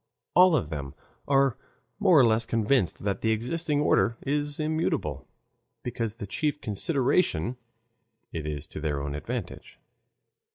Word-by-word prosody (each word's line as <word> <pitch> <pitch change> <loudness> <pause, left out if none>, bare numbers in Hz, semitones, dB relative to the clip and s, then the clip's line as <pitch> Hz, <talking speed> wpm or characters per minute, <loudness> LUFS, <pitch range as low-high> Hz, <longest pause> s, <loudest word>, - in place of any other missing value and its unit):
All 180 -1 +7
of 100 - 0
them 70 -3 -5 0.3
are 135 -3 +3 0.4
more 190 -6 +5
or 130 - +7
less 115 0 +3
convinced 115 -4 +1
that 100 -1 -1
the 110 - +1
existing 145 +7 0
order 115 -5 +3
is 145 +1 -1
immutable, 155 +1 -1 0.6
because 115 -3 -3
the 115 - -6
chief 145 +8 -1
consideration 125 - 0 0.8
it 80 -2 -4
is 75 -1 -4
to 75 - -8
their 75 -2 -2
advantage. 90 - -5
115 Hz, 130 wpm, -27 LUFS, 95-145 Hz, 0.8 s, All